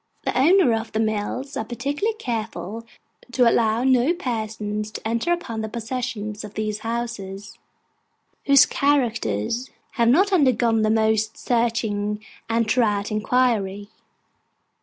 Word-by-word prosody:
The - - -2
owners 265 - +4
of 225 - -12
the 215 - 0
mills 220 +6 -2
are 245 - -2
particularly 285 - -2
careful 225 - -5 0.5
to 250 -2 +4
allow 230 0 +2
no 260 +5 +3
persons 215 - -3
to - - -5
enter 235 +9 0
upon 265 -11 -2
the 220 - -4
possession 225 -2 -4
of 210 -1 -10
these 215 -1 -2
houses, 220 -4 -5 0.9
whose 280 0 +7
characters 235 - 0 0.2
have 235 -3 +1
not 385 +10 +4
undergone 240 -8 +3
the 215 - +2
most 220 0 +1
searching 220 -3 -1 0.2
and 230 0 +2
thorough 215 -4 +2
inquiry. 215 -3 0
230 Hz, 125 wpm, -23 LUFS, 215-255 Hz, 0.9 s, whose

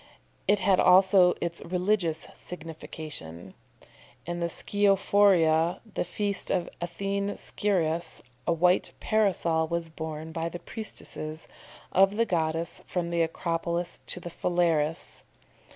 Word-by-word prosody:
It 205 - +5
had 190 -1 +3
also 185 -1 +6
its 170 0 -3
religious 180 -2 0
signification. 155 - -8 0.7
In 175 +1 -3
the 170 0 -1
Scirophoria, 195 -4 +3
the - - 0
feast 200 +3 -2
of 175 - 0
Athene 200 +3 -2
Sciras, 170 -5 -1 0.2
a - - +3
white 180 +2 +3
Parasol 180 -7 +1
was 170 0 -3
borne 160 0 -6
by 165 0 -2
the 175 - -6
priestesses 165 -5 -6 0.4
of 195 +2 +4
the 230 +2 +2
goddess 165 -3 -1
from 175 -2 -2
the 170 0 +1
Acropolis 170 +1 -1
to - - -3
the 175 -1 -7
Phalerus. 165 -2 0
170 Hz, 120 wpm, -28 LUFS, 160-190 Hz, 0.7 s, also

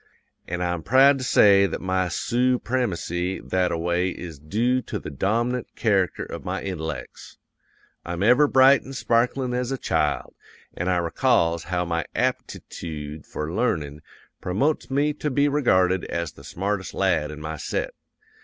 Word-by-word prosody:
An' 90 +1 -3
I'm 90 -1 -1
proud 135 - +5
to - - -4
say 100 -5 +5
that - - -4
my 95 0 0
soopremacy 115 -6 -1
that 90 -1 +1
a 85 - -1
way 85 +2 0
is 85 -4 -8
doo 115 - 0
to - - -5
the - - -7
dom'nant 115 - -1
character 100 -6 +1
of - - -8
my - - -3
intellects. 80 -5 -6 0.7
I'm 85 +2 -3
ever 125 +7 +5
bright 135 0 +6
an' 135 - -9
sparklin' 125 +1 0
as 125 +1 -1
a 135 - -1
child, - - -1 0.4
an' 90 - -4
I 90 -1 +2
recalls 85 0 +1
how 90 0 -1
my 85 -1 -2
aptitoode 75 -2 -4
for 75 +2 -5
learnin' 75 - -1 0.4
promotes 135 +15 0
me 145 +2 +1
to 150 - -3
be 140 +1 +2
regyarded 95 -11 +2
as 85 -2 -3
the - - -16
smartest 95 +1 -3
lad 75 - +1
in 75 0 -8
my 80 +1 -5
set. - - -3
95 Hz, 155 wpm, -24 LUFS, 85-125 Hz, 0.7 s, bright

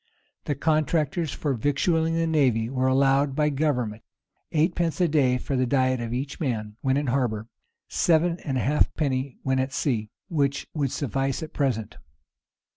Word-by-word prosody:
The 145 - -1
contractors 155 +1 +1
for 145 0 -2
victualling 160 +6 +1
the 165 0 +1
navy 130 -8 +2
were 130 -1 +1
allowed 135 +1 +3
by 150 0 +2
government 125 -7 -1 0.5
eightpence 165 +1 +1
a 180 - +4
day 135 -5 +3
for 135 +2 -3
the 130 -1 +1
diet 130 -1 +2
of 115 -1 -4
each 135 +3 -4
man 110 -8 -2
when 130 0 +1
in 145 - 0
harbor, 120 -4 -1 0.4
sevenpence 170 +1 +2 0.2
halfpenny 135 -1 0
when 130 0 +1
at 130 +1 -1
sea; 110 -8 -1
[] - - -65
which 140 -4 0
would 140 -4 -1
suffice 135 +3 -1
at 155 - -8
present. 120 -5 -1
140 Hz, 155 wpm, -25 LUFS, 130-155 Hz, 0.5 s, a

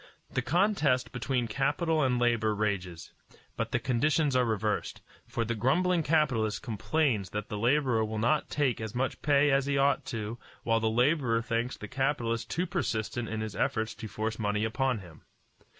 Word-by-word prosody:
The 130 - +1
contest 150 - +2
between 125 -1 -1
capital 150 +7 +1
and 130 -3 +2
labor 115 -3 +2
rages, 95 -5 -3 0.4
but - - -3
the - - +2
conditions 140 +3 +1
are 125 -1 +4
reversed; 110 -2 -1 0.3
for 115 - -2
the 115 - -1
grumbling 170 - +2
capitalist 135 -9 +1
complains 115 - 0
that 105 +1 -5
the 105 - -3
laborer 125 -1 +2
will 110 0 -3
not 145 +8 +1
take 135 -6 0
as 110 +1 -5
much 130 +2 -1
pay 145 0 +4
as 135 0 +2
he 140 -1 +1
ought 140 +1 +3
to 115 -1 -4 0.2
while 115 -1 +2
the 110 0 +1
laborer 120 -1 +2
thinks 115 +2 -2
the - - -7
capitalist 120 -4 -1
too 175 +3 -1
persistent 120 - -2
in 110 0 -3
his 110 -1 -5
efforts 110 -1 0
to 110 - -8
force 110 +1 -3
money 105 0 0
upon 125 0 0
him. 85 -4 -14
120 Hz, 175 wpm, -29 LUFS, 110-140 Hz, 0.4 s, are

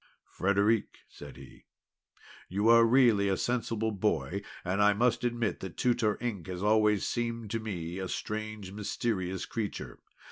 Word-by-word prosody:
"Frederic," 100 +3 0
said - - -12
he, 70 -1 -14 0.8
"you 100 +5 +1
are 115 0 +8
really 115 -5 +4
a 95 - +1
sensible 115 -2 -1
boy, 100 -1 -1 0.2
and 95 +3 0
I 105 0 +5
must 120 +3 +1
admit 120 -2 -1
that 95 -2 -8
Tutor 120 -4 +1
Ink 105 -9 -4
has 90 +1 -5
always 105 -1 +3
seemed 115 -2 -3
to 115 - -1
me 90 -5 -5
a 95 - -3
strange 110 -2 -5
mysterious 100 -2 -2
creature. 100 - -5
105 Hz, 145 wpm, -30 LUFS, 95-115 Hz, 0.8 s, are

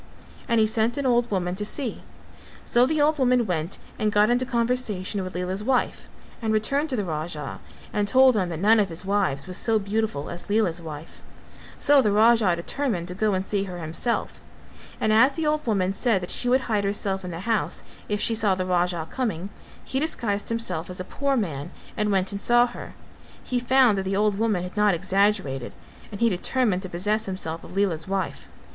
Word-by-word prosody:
And 230 -1 +2
he 220 - +5
sent 220 +3 0
an 280 - -2
old 240 -1 +2
woman 180 -3 -1
to 210 - -2
see; 240 +3 -3 0.6
so 245 +1 +4
the 310 +2 0
old 300 +1 +3
woman 250 -2 +3
went 170 -2 -2 0.2
and 215 -1 +1
got 210 +2 +4
into 245 +1 +1
conversation 230 -6 0
with 185 -1 -7
Lela's 185 +3 -3
wife 255 +2 -1 0.3
and 220 -1 -1
returned 275 +8 +1
to 260 - +1
the 205 -4 -1
Raja 155 -3 -4 0.3
and 205 -1 0
told 260 +2 +5
him 185 -4 0
that 165 - -4
none 215 +6 +4
of 200 -2 +1
his 170 +3 -6
wives 190 -9 0
was 185 0 -3
so 225 -1 +2
beautiful 205 -7 -2
as 175 +4 -8
Lela's 200 -5 +1
wife; 155 0 -9 0.6
so 285 -1 +5
the 210 -5 +1
Raja 215 -3 +4
determined 180 0 -2
to - - -4
go 205 +1 +1
and 190 0 -2
see 200 -1 0
her 180 -2 -7
himself, 170 +8 -2 0.6
and 215 - +2
as 255 +6 +5
the 325 +1 -2
old 300 -2 0
woman 195 -4 +1
said 210 -1 +1
that 180 - -4
she 245 - +1
would 260 +2 +4
hide 215 -5 -1
herself 200 -1 -1
in 180 - -5
the 170 0 -6
house 225 +1 -1 0.3
if 210 0 0
she 230 - +2
saw 215 -4 +3
the 185 0 -2
Raja 175 -2 0
coming, 200 -5 -3 0.4
he 265 - -2
disguised 225 -9 -1
himself 185 -8 -2
as 180 - -4
a - - -2
poor 275 +7 -1
man 160 - -3 0.3
and 210 -1 0
went 190 -1 +1
and 200 0 -3
saw 240 +2 +5
her; 245 - -9 0.5
he 250 - -1
found 245 -4 +4
that - - -2
the 190 +1 -1
old 205 0 +1
woman 215 -6 +1
had 180 +2 -7
not 210 -3 +3
exaggerated 190 - 0 0.4
and 200 - -8
he 235 - +5
determined 205 +1 0
to 185 - -7
possess 205 +5 -1
himself 170 -4 -4
of 190 - -10
Lela's 180 -5 0
wife. 190 -2 -3
205 Hz, 205 wpm, -25 LUFS, 180-235 Hz, 0.6 s, he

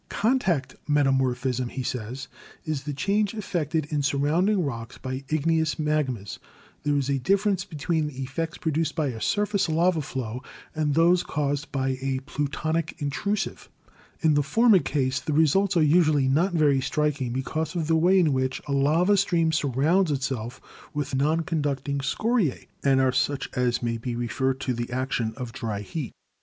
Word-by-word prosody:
"Contact 205 - 0
metamorphism," 130 -3 +1
he 130 - -4
says, 125 +1 -4 0.4
''is 150 -3 -3
the 150 - -2
change 200 +8 0
effected 160 -7 -1
in 150 -1 +1
surrounding 155 +8 +2
rocks 115 -4 -5
by 130 +1 -5
igneous 160 0 +1
magmas. 150 -9 -2 0.4
There 145 0 0
is 140 -2 0
a 140 -1 0
difference 195 +5 +1
between 160 -2 -1
the 135 -2 -6
effects 160 +6 -4
produced 160 0 -1
by 155 -4 0
a 115 -3 -6
surface 205 -3 +1
lava 165 +1 +2
flow 125 -3 -5 0.3
and 150 -2 0
those 170 +2 +5
caused 145 0 -2
by 130 -2 -1
a 135 -1 -1
plutonic 155 +3 -2
intrusive. 180 +7 -2 0.5
In 160 -2 +4
the 145 - +3
former 220 - +4
case 135 -5 0
the 155 - -3
results 175 +5 +3
are 160 - +5
usually 150 -3 +4
not 165 +8 +2
very 150 -5 +3
strik 150 +1 0
ing 125 -2 -2
because 155 +7 -3
of 165 -3 -1
the 160 +1 +2
way 180 +4 +4
in 165 -6 +4
which 130 0 -1
a - - -3
lava 155 +8 +3
stream 170 -4 +2
surrounds 155 +5 +2
itself 130 -4 -3 0.4
with 145 -1 -3
non 155 +5 +2
conducting 145 -4 -2
scoriae, 200 - 0 0.2
and 135 -1 +4
are 130 -1 +3
such 135 +2 -1
as 125 -1 0
may 115 -1 -1
be 120 +1 -4
referred 130 +3 -1
to 130 - -1
the 120 0 -4
action 130 -3 -1
of 125 -3 -6
dry 105 -4 -3
heat. 130 +5 -5
145 Hz, 170 wpm, -26 LUFS, 130-165 Hz, 0.5 s, those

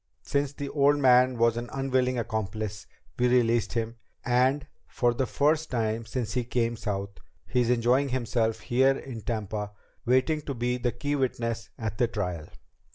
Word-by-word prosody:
Since 140 0 -1
the 140 -1 -5
old 145 0 +3
man 125 -2 +5
was 115 0 +3
an 120 0 -4
unwilling 130 -2 0
accomplice, 110 -2 -3 0.3
we 125 - +4
released 120 -2 +2
him, 115 0 -2 0.3
and, 130 +3 +2 0.2
for 120 -1 +1
the 130 +1 -1
first 155 +6 +1
time 115 -1 -1
since 120 -5 -3
he 125 -1 0
came 120 -1 0
South, 100 -3 -4 0.3
he's 125 -2 +1
enjoying 125 +3 +3
himself 115 -3 0
here 135 +2 +3
in 120 -4 -7
Tampa 105 -1 -3 0.3
waiting 130 +5 +2
to 140 -2 -5
be 120 +1 0
the 120 0 0
key 145 +3 -2
witness 115 -5 -2
at 110 -2 -4
the 120 - +4
trial." 90 -8 -4
120 Hz, 160 wpm, -27 LUFS, 115-130 Hz, 0.3 s, man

